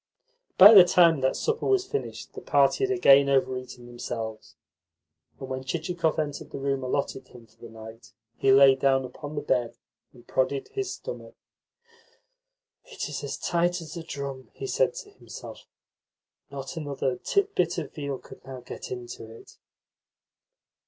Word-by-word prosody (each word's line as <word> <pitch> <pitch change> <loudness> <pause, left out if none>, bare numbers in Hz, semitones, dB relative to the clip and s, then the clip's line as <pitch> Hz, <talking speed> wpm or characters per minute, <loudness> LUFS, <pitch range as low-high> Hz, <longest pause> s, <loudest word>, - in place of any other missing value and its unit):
By 200 +4 +11
the 195 -4 +11
time 170 -4 +4
that 130 0 +1
supper 455 0 -1
was 390 -2 +2
finished 425 +2 -5
the - - -8
party - - +2
had 395 - +1
again 140 - +5
over 130 -1 +2
eaten 125 -1 -9
themselves, 115 -2 -7 0.8
and 135 - -7
when 130 0 -5
Chichikov 165 +3 -2
entered 145 -2 -3
the - - -7
room 135 -1 -2
allotted 130 0 -3
him 120 -2 -15
for 110 - -29
the 115 - -10
night, 115 +1 -12 0.2
he 135 - +2
lay 135 0 +8
down 135 0 +1
upon 145 +4 -9
the 145 - -3
bed, 125 -4 -1 0.3
and 120 -1 -18
prodded 135 +1 -1
his 395 -2 -3
stomach. - - -8 1.5
"It - - -6
is - - -5
as - - -4
tight 175 +1 0
as 160 -1 -9
a 170 - -5
drum," 140 -4 -7
he - - -6
said 480 +3 +1
to 485 -4 -9
himself. 410 - -11 0.8
"Not 140 +3 -7
another 140 -4 -2
titbit 400 0 0
of - - -5
veal 140 -3 -4
could - - -15
now 130 -1 -9
get - - -9
into 120 -2 -8
it." 115 - -15
140 Hz, 160 wpm, -26 LUFS, 130-175 Hz, 1.5 s, By